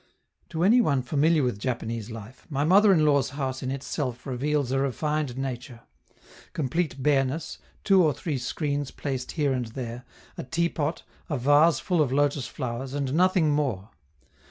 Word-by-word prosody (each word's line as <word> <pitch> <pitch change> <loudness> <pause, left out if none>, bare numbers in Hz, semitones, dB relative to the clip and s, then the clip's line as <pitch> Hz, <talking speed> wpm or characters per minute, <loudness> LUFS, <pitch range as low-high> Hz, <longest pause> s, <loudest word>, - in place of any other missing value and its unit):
To 165 0 -2
any 230 +6 +6
one 140 - +1
familiar 150 +4 +2
with 125 -5 -1
Japanese 115 -2 -3
life, 115 +2 -10
my 140 -1 0
mother 195 +6 +6
in 160 -5 +4
law's 140 -3 +3
house 130 -2 -2
in 130 - -3
itself 130 -1 -4
reveals 140 +1 -1
a 135 - +1
refined 140 0 -1
nature 125 -3 -5 0.7
complete 145 -1 -2
bareness, 140 +1 0 0.2
two 195 -3 +5
or 155 - +4
three 145 -1 -3
screens 145 +2 -2
placed 130 -3 -4
here 145 -4 +1
and 125 -2 -2
there, 120 +1 -6 0.4
a - - -3
teapot, 165 0 -1 0.3
a 145 - -1
vase 145 +4 +4
full 175 +3 +1
of 140 -4 +1
lotus 140 -2 +1
flowers, 130 +1 -5
and 140 -2 -2
nothing 180 -2 +3
more. 125 -9 -1
140 Hz, 160 wpm, -26 LUFS, 130-155 Hz, 0.7 s, any